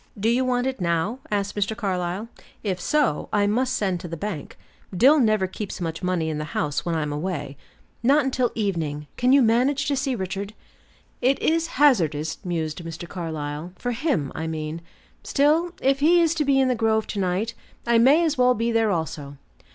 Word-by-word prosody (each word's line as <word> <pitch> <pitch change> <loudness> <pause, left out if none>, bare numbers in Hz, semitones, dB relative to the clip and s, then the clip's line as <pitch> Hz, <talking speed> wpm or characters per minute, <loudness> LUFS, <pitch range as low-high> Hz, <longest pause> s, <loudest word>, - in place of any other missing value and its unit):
"Do 220 +3 +2
you 245 +2 +2
want 250 -1 0
it 265 -5 -3
now?" 170 +8 0
asked 200 -1 -1
Mr. 205 +1 -1
Carlyle. 185 0 -2 0.4
"If 185 -4 -2
so, 295 - +1
I 205 -1 +2
must 250 +5 +1
send 190 -6 0
to 175 - -7
the 165 0 -6
bank. 175 -4 -5 0.4
Dill 280 - +6
never 215 -5 +3
keeps 190 +2 -6
much 165 -2 -4
money 180 -3 0
in 155 -1 -2
the 150 0 -5
house 145 -1 -1
when 170 -1 -1
I'm 150 -2 -2
away." 145 -3 -4 0.5
"Not 275 +4 +4
until 255 -2 0
evening. 165 -9 -2
Can 250 +1 +2
you 275 -1 +6
manage 255 +5 +2
to 285 - +1
see 270 -1 -1
Richard?" 195 +1 -4 0.7
"It 265 +3 +3
is 330 +1 +1
hazardous," 165 - +3
mused 165 -2 -3
Mr. 165 +1 -7
Carlyle; 160 -1 -5
"for 245 +6 -3
him, 230 - -1
I 160 0 -4
mean. 155 0 -4 0.4
Still, 310 +5 +2
if 275 +1 +2
he 335 +4 +5
is 330 -1 +3
to 310 -3 -1
be 275 -1 +3
in 265 - +3
the 255 - +2
grove 220 -2 +1
to 205 - -4
night, 190 +5 -1 0.3
I 235 -1 +4
may 280 +8 +5
as 305 -4 -1
well 250 0 +5
be 230 +2 0
there 225 -1 +2
also. 150 -5 -3
210 Hz, 195 wpm, -24 LUFS, 165-255 Hz, 0.7 s, Dill